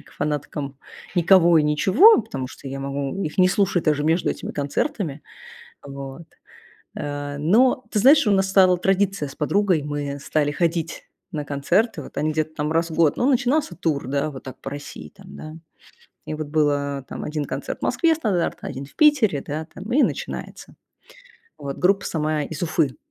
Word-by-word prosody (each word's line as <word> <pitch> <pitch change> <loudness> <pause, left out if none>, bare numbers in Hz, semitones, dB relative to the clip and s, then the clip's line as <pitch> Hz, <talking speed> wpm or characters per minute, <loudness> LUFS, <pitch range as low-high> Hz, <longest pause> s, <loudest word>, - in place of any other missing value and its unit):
к - - -19
фанаткам 145 -2 -4 0.4
никого 175 -1 +5
и - - +3
ничего, 190 - +5
потому 135 -8 -5
что 140 - -12
я 135 +1 -5
могу 140 +6 -3
их 150 - -4
не 185 - +6
слушать 185 -2 +1
даже 150 -1 +1
между 165 +3 +2
этими - - -6
концертами. 150 - -2 0.7
Вот. 135 +2 -8 0.7
Э, 145 0 -5
но, 230 - +3
ты 210 - +1
знаешь, 280 +2 +6
у - - +4
нас 190 -1 +2
стала 185 -2 +5
традиция 195 -4 0
с 135 - -12
подругой, 185 +1 +1
мы, 145 -1 -3
э, - - -9
стали 145 +1 0
ходить 165 +1 -2 0.3
на 150 -2 -4
концерты. 170 - 0
Вот - - -12
они 155 +1 0
где-то 155 0 -2
там 150 0 -2
раз 165 +1 +1
в 160 - -6
год. 160 -3 +3
Ну, 250 - +1
начинался 255 - +1
тур, 155 -6 -2
да, 140 +3 -1
вот 130 - -10
так 130 - -9
по - - -6
России, 145 - -8
там, 70 - -13
да. 155 - -9 0.7
И 155 - -4
вот 155 -1 -5
было 145 -2 0
там - - -7
1 150 -1 -3
концерт - - -5
в - - -32
Москве 330 -2 +2
стандартно, 205 - -2
1 135 0 -6
в 140 - -16
Питере, 265 - +3
да, 155 +2 -4
там 195 +5 -9
и 290 - +4
начинается. - - -4 0.8
Вот 140 -1 -5
группа 195 +2 +2
сама 155 -2 -1
из 155 +1 -7
Уфы. 160 -5 0
155 Hz, 185 wpm, -22 LUFS, 145-190 Hz, 0.8 s, не